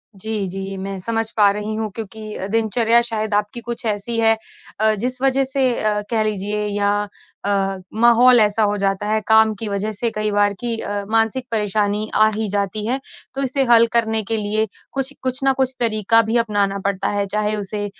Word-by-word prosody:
जी, 210 0 -3
जी। 195 +1 -6
मैं 195 0 -6
समझ 225 +2 -2
पा 205 -1 +6
रही 210 +1 -5
हूँ 220 0 -3
क्योंकि 215 -1 -7
दिनचर्या 225 +1 +4
शायद 220 -2 -3
आपकी 210 +3 -1
कुछ 235 +1 -6
ऐसी 220 +2 -1
है 225 -1 +4 0.4
अ, 220 0 +4
जिस 250 +4 -3
वज़ह 270 0 +2
से 265 -1 0
अ, 210 -1 +1
कह 225 -3 +1
लीजिए 210 0 -2
या 200 0 +1 0.6
अ, 195 -1 0 0.2
माहौल 240 +1 +6
ऐसा 215 0 +3
हो 205 0 +1
जाता 195 0 -1
है 215 +1 +1
काम 220 0 +5
की 225 - -1
वज़ह 205 +1 -3
से 225 +3 0
कई 215 0 -1
बार 205 0 +2
कि 240 -1 -1
अ, 205 -2 -4
मानसिक 225 +3 +1
परेशानी 210 0 -1
आ 215 - +5
ही 220 0 -2
जाती 205 +1 -2
है। 260 +3 0 0.4
तो 275 - -2
इसे 270 +1 +1
हल 230 0 +7
करने 220 -1 +4
के 225 +2 +1
लिए 215 +1 0 0.3
कुछ 270 +1 -1
कुछ 255 0 -2
न 270 - +3
कुछ 260 -1 0
तरीका 225 -1 +4
भी 225 +2 -1
अपनाना 205 -3 0
पड़ता 200 -1 -1
है, 205 -1 -1
चाहे 210 +1 -1
उसे 205 0 -4
215 Hz, 195 wpm, -19 LUFS, 205-230 Hz, 0.6 s, हल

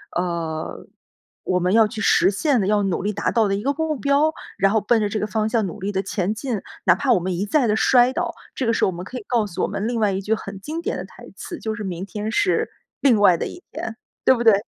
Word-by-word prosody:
呃， 170 -3 -3 0.6
我 180 0 +1
们 180 +2 +1
要 220 -1 +6
去 215 0 -6
实 - - +4
现 265 +4 +1
的， - - 0
要 210 0 +3
努 190 -3 -1
力 210 - 0
达 - - -1
到 225 -3 +3
的 195 - 0
一 200 - -3
个 280 +2 +1
目 315 0 -1
标， 280 +4 +2 0.3
然 195 +1 +4
后 220 - +3
奔 225 +2 +2
着 210 - 0
这 215 - -2
个 - - -1
方 215 +2 0
向 220 -2 +1
努 - - -8
力 195 +2 -2
地 190 -1 0
前 195 0 -1
进， 230 -3 -3 0.2
哪 175 - +7
怕 255 +5 0
我 220 - +3
们 180 +1 -2
一 195 +4 -1
再 260 +4 +3
的 210 - +2
摔 245 +3 +4
倒。 - - -2 0.2
这 260 - -1
个 230 - +3
时 - - 0
候 - - +3
我 175 - -8
们 175 - -6
可 250 +6 -7
以 210 - -14
告 235 -4 +1
诉 180 - -5
我 - - +2
们 210 +3 -3
另 235 -1 -1
外 210 -2 +2
一 190 +1 -2
句 215 +3 0
很 195 -2 -8
经 320 +6 -4
典 - - -1
的 - - -4
台 - - -14
词， 345 - -7
就 220 -1 -3
是： 210 - -6
“明 185 0 -4
天 210 +1 -4
是 405 - +1 0.3
另 250 -6 +4
外 185 -4 +6
的 - - -3
一 355 - -10
天，” 225 0 -5 0.3
对 260 - +7
不 240 - -2
对？ 225 - +7
215 Hz, 305 characters per minute, -22 LUFS, 195-245 Hz, 0.6 s, 哪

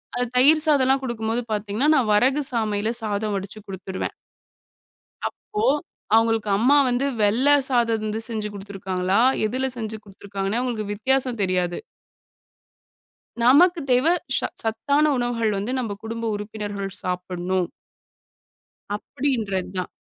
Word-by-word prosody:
அது 245 0 0
தயிர் 305 +5 +6
சாதல்லாம் 270 -2 +3
குடுக்கும்போது 230 0 -2
பாத்தீங்கன்னா, 210 +7 0
நான் 225 -5 +2
வரகுசாமையில 225 -3 +1
சாதம் 210 -1 -1
வடிச்சு 200 +2 -7
குடுத்துருவேன். 190 -1 -5 1.2
அப்போ 425 0 -6 0.5
அவுங்களுக்கு 225 -2 +2
அம்மா 260 +7 +4
வந்து 245 +3 0 0.2
வெள்ள 225 +7 +3 0.2
சாதம் 235 -3 +2
இருந்து 215 0 -3
செஞ்சு 215 -2 -3
குடுத்திருக்காங்களா, 195 -1 -2 0.3
எதுல 260 +4 -1
செஞ்சு 220 -1 -4
குடுத்திருக்காங்கன்னே 200 +2 -4
அவுங்களுக்கு 225 -5 -2
வித்தியாசம் 255 +1 0
தெரியாது. 180 -2 0 1.7
நமக்குத் 320 +5 +5
தேவை 260 +8 +4 0.2
சா - - 0
சத்தான 255 +7 +1
உணவுகள் 230 -3 0
வந்து 205 +5 -3
நம்ப 225 -5 -2
குடும்ப 230 +1 -4
உறுப்பினர்கள் 205 -1 -5
சாப்பிடணும். 180 0 -2 1.3
அப்டின்றதுதான். 200 -7 -2
220 Hz, 110 wpm, -23 LUFS, 200-250 Hz, 1.7 s, தயிர்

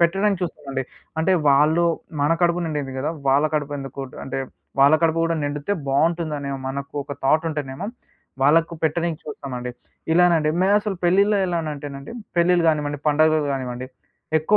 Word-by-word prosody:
పెట్టడానికి 195 +3 +2
చూస్తామండి. 140 -5 -3 0.4
అంటే, 190 +4 +3 0.2
వాళ్ళూ 150 +5 +4 0.4
మన 150 +3 +3
కడుపు 175 0 +3
నిండింది 145 -4 -3
గదా! 150 +4 -1 0.2
వాళ్ళ 140 +3 +4
కడుపెందుకు 140 -2 -3 0.2
అంటే, 135 - -4 0.4
వాళ్ళ 140 +3 +7
కడుపు 165 0 +3
గూడా 165 0 +1
నిండితే 145 +5 -2 0.2
బావుంటుందనే 150 0 0 0.2
మనకు 140 +2 -5
ఒక 145 - -6
థాటుంటేనేమో, 150 +1 0 0.6
వాళ్ళకు 165 +4 +4
పెట్టనీకి 165 +1 0
చూస్తామండి. 125 -4 -5 0.4
ఇలానండి. 165 -3 +4
మెయినసలు 205 +1 +2
పెళ్ళిలో 200 +4 +4
ఎలానంటేనండి, 150 -4 -4 0.2
పెళ్ళిళ్ళు 175 0 +4
గానివ్వండి, 145 -2 0
పండగలు 155 +1 +4
గానివ్వండి, 125 -1 -4 0.5
ఎక్కువ 200 +7 +3
155 Hz, 130 wpm, -22 LUFS, 140-170 Hz, 0.6 s, వాళ్ళ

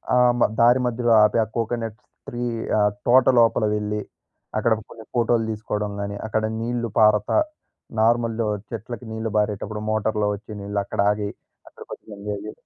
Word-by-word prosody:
ఆహ్, 125 0 +5
మ - - -2 0.2
దారి 120 +2 +6
మధ్యలో 120 0 0
ఆపి 105 +2 +3
ఆ - - -2
కోకోనట్ 115 -1 -2 0.3
ట్రీ 120 0 -4 0.4
ఆహ్, 105 0 +3 0.2
తోట 125 +1 +6
లోపల 115 -1 +4
వెళ్ళి, 105 0 -2 0.6
అక్కడ 110 +1 +3 0.2
కొన్ని 110 - -12
ఫోటోలు 115 -1 +2
తీసుకోవడం 105 -1 -3
గాని 100 0 -4
అక్కడ 110 0 0 0.2
నీళ్ళు 120 0 -2
పారతా 105 -1 +4 0.6
నార్మల్‍లో 115 0 +2 0.2
చెట్లకి 120 +2 -6
నీళ్లు 110 0 -3
పారేటప్పుడు 105 0 -1
మోటర్‌లో 110 -1 0
వచ్చి 105 +2 -12
నీళ్ళు 100 +1 -2
అక్కడ - - -7
ఆగి 105 -1 -2 0.4
అక్కడ - - -12
కొంచెం - - -10
ఎంజాయ్ 100 0 -5
జే 105 - -5
110 Hz, 155 wpm, -23 LUFS, 105-115 Hz, 0.6 s, దారి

